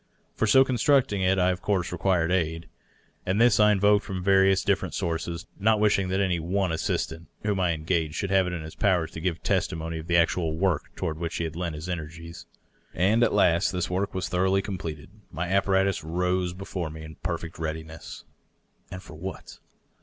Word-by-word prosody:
For 110 - 0
so 130 +5 +6
con 130 -2 -1
structing 120 -6 +3
it 95 +1 +3
I 90 0 +3
of 90 - -4
course 95 -4 0
required 90 -1 +1
aid, 80 -2 -1 0.6
and 95 +3 0
this 120 -2 +5
I 105 0 +6
invoked 105 +1 +3
from 95 -1 -5
various 95 0 +4
different - - 0
sources, 85 0 -3
not 110 +1 +3
wishing 100 -2 +2
that 95 +1 0
any 95 -3 +1
one 90 +2 -1
assistant 80 0 -2 0.2
whom 105 -2 0
I 90 -2 +2
engaged 80 -1 -1
should 100 +1 -2
have 95 -1 +3
it 90 - -3
in 85 -2 -4
his 80 - -9
power 90 -5 +2
to 80 0 -8
give 85 -2 -2
testimony 80 0 -1
of 80 - -9
the 85 -1 +3
actual 85 -1 +1
work 90 -3 0
toward 80 0 -3
which 85 -1 -3
he - - -1
had 80 -1 -4
lent 85 -2 -3
his 80 +3 -7
energies^ 85 0 -7 0.5
And 105 +6 +3
at - - +3
last 90 -3 +3
this 90 -1 -2
work 95 +2 -1
was 95 - -2
thoroughly 95 +2 +1
completed. 80 -7 -6 0.2
My 85 +4 -3
apparatus 95 -1 +1
rose 90 +2 -1
before 95 -3 -5
me 80 0 -9
in 80 -1 -10
perfect 85 -1 -4
readiness. 80 0 -6 0.7
And 90 +1 -8
for - - -12
what? 95 +5 -8
90 Hz, 200 wpm, -26 LUFS, 80-95 Hz, 0.7 s, so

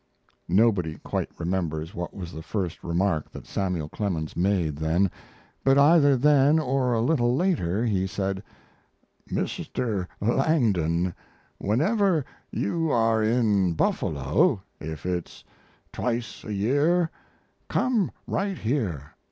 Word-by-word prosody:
Nobody 95 -5 +2
quite - - -2
remembers 85 -2 -2
what 85 0 -4
was 90 -3 -7
the 80 - -6
first 90 -1 -4
remark 85 -2 0
that - - -10
Samuel 90 -6 -2
Clemens 80 -4 -3
made 90 -5 +1
then; 85 +5 +1 0.5
but 135 0 +4
either 145 -1 +6
then 145 +2 +5
or 130 -4 +1
a 115 - +1
little 120 -2 +2
later 120 - +1
he 95 -4 +1
said: 95 0 -2 0.9
"Mr. 105 -7 -2
Langdon, 100 - +1 0.5
whenever 165 - +2 0.2
you 165 +10 -1
are 115 -3 +3
in 110 -5 +2
Buffalo, 75 +4 +1 0.2
if 80 0 -7
it's 90 -2 -4 0.5
twice 120 -1 -3
a 110 - -6
year, 145 - +2 0.6
come 240 -7 +1 0.2
right 195 -2 -1
here. 105 - -2
105 Hz, 115 wpm, -26 LUFS, 85-135 Hz, 0.9 s, either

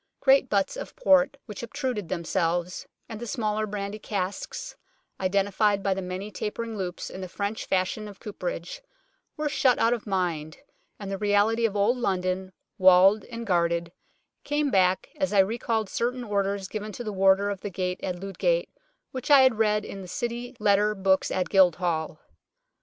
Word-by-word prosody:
Great 270 -1 +4
butts 200 - +1
of - - -7
port 280 - +4
which 210 -4 -8
obtruded 235 -5 -3
themselves, 175 0 -1 0.2
and 220 - -7
the 240 - -6
smaller 215 -1 -1
brandy 200 0 -4
casks, 200 -2 -4 0.4
identified 200 +1 +1
by 195 - +2
the 190 - -4
many 185 +3 -5
tapering 225 +2 -4
loops 180 -3 -5
in 190 - -7
the 185 - -5
French 205 +3 -3
fashion 190 +3 -1
of 200 -1 -11
cooperage, - - -5 0.6
were 300 0 -1
shut 265 -4 +3
out 230 +1 +3
of 230 -3 -5
mind, 170 -6 -2 0.4
and 200 -1 -6
the 195 - -3
reality 210 +3 +2
of 210 - -8
Old 210 +5 +2
London, 185 -4 -1 0.3
walled 190 +2 +6
and 230 -1 -7
guarded, 170 -3 +1 0.5
came 295 -1 0
back 185 -2 +2
as 285 -6 -1
I - - +2
recalled 220 +1 -1
certain 245 +4 -2
orders 200 -2 -1
given 215 +1 -5
to 240 - -6
the 215 -2 -4
Warder 195 +1 +3
of 195 - -6
the 205 - -4
Gate 180 -1 -3
at 180 -1 -3
Ludgate - - 0 0.4
which 255 +1 -6
I 285 -2 +8
had 260 -4 +4
read 210 -1 +2
in 195 - -7
the 185 - -9
City 240 +5 -4
Letter 210 0 +3
Books 190 -1 +2
at 185 - -1
Guildhall. 175 -4 +2
205 Hz, 170 wpm, -26 LUFS, 190-230 Hz, 0.6 s, I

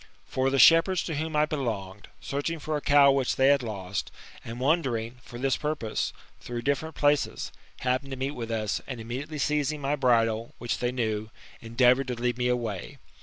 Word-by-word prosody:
For 130 +1 0
the 135 - 0
shepherds 165 - +6
to 165 - -4
whom 160 +1 -3
I 150 0 +4
belonged, 110 -10 -4
searching, 145 +4 -3
for 155 0 -3
a 150 - -2
cow 140 -1 +6
which 135 -2 +1
they 135 +1 +4
had 140 -1 +4
lost, 100 -4 -4 0.3
and 115 +2 -7
wandering 125 -5 0
for 120 - -10
this 135 +1 +1
purpose, 150 -8 -2 0.3
through 120 -1 -5
different 140 +4 -1
places, 145 0 +1 0.3
happened 130 +2 0
to 135 - -5
meet 135 +2 -2
with 120 -5 -6
us, 110 -2 -1
and 130 -3 -5
immediately 130 +7 -5
seizing 150 +1 0
my 140 +1 0
bridle, 115 -4 +1
which 120 0 -3
they 120 0 0
knew, 110 -4 -2 0.3
endeavoured 125 +3 +3
to 125 - -2
lead 120 +1 -1
me 125 - +1
away. 115 -6 -2
130 Hz, 185 wpm, -27 LUFS, 115-145 Hz, 0.3 s, shepherds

